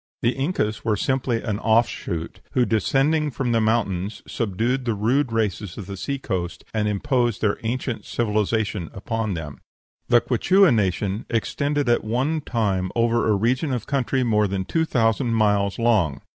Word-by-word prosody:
The 120 - +4
Incas 135 - -2
were 110 -2 +1
simply 125 +1 -1
an 105 -2 -2
offshoot, 110 -7 0
who, 125 - +3
descending 140 +8 +2
from 125 -1 -2
the 115 -1 +2
mountains, 105 -3 -1
subdued 115 +4 -1
the 115 -3 -1
rude 120 +6 +1
races 105 -4 -2
of 105 - -6
the 100 +1 -6
sea 140 +9 -3
coast, 95 -9 -4
and 105 -1 0
imposed 120 +1 0
their 105 -2 +1
ancient 120 +1 -3
civilization 105 -4 -1
upon 110 0 -2
them. 75 -3 -7 0.5
The 120 - +6
Quichua 180 - +3
nation 100 0 -1
extended 140 +5 -1
at 120 - +2
one 130 +8 0
time 100 -8 -1
over 115 -1 +2
a 105 - +4
region 125 +8 0
of 125 -4 -2
country 135 -1 0
more 105 -3 +2
than 95 -1 -2
two 160 - 0
thousand 115 -2 +1
miles 105 -2 +2
long. 100 - +2
115 Hz, 160 wpm, -23 LUFS, 105-125 Hz, 0.5 s, The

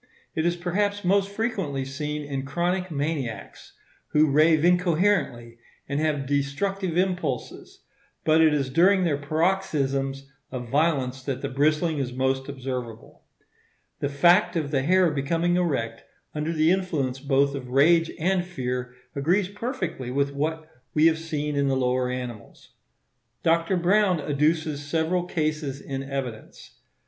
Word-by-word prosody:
It 160 +1 0
is 175 - +1
perhaps 200 +3 -1
most 195 +2 +3
frequently 200 - -2
seen 150 +2 -4
in 140 -2 -4
chronic 175 +6 -1
maniacs, 140 - -4 0.4
who 150 -1 +4
rave 155 +2 +4
incoherently 175 - +1 0.3
and 140 +1 -1
have 150 -3 0
destructive 165 +7 -1
impulses; 180 -8 -2 0.4
but 160 +1 +4
it 160 -1 +5
is 140 -3 -1
during 185 +6 +4
their 150 -5 +1
paroxysms 140 -4 -1 0.2
of 125 -2 -6
violence 135 -3 +1
that 130 -1 -4
the 140 - -1
bristling 155 +3 +1
is 125 -2 -3
most 130 +1 -1
observable. 125 -4 -6 0.8
The 140 - -1
fact 175 +7 +4
of 150 -4 -1
the 135 -3 +1
hair 180 +3 +3
becoming 165 +5 0
erect 130 -11 -1 0.3
under 150 +2 -2
the 160 0 +3
influence 155 -9 -1
both 140 0 +2
of 130 -3 -6
rage 165 +5 +4
and 180 +2 +1
fear 125 -7 -4 0.2
agrees 180 +7 +1
perfectly 200 - -4
with 140 +2 0
what 155 +2 -2 0.3
we 155 +1 +5
have 160 -1 +4
seen 150 -2 -3
in 140 0 +1
the 135 -1 +1
lower 125 0 +1
animals. 125 -4 -7 0.7
Dr. 165 +2 +2
Browne 185 0 +3
adduces 150 +1 0
several 165 +4 0
cases 155 -5 -2
in 135 -1 -5
evidence. 135 -5 -7
150 Hz, 140 wpm, -25 LUFS, 135-175 Hz, 0.8 s, it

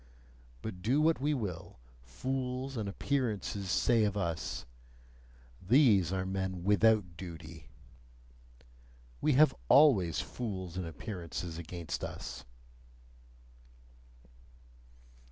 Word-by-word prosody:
But 90 -5 -6
do 125 +9 +2
what 160 -2 +3
we 150 +1 +1
will, 95 - -5 0.2
fools 130 - -3
and 105 -4 -2
appearances 105 -6 -2
say 115 +3 +3
of 105 -1 0
us: 85 -7 -3 1.0
"These 105 - +4
are 95 -1 -1
men 95 -1 -3
WITHOUT 105 -2 +3
duty," 80 -2 -9 1.5
we 150 - +3
have 145 +1 +6 0.2
always 115 - +5
fools 95 -7 -5
and 90 -2 -3
appearances 85 -1 -6
against 85 0 -5
us! 65 -1 -6
100 Hz, 95 wpm, -32 LUFS, 85-125 Hz, 1.5 s, have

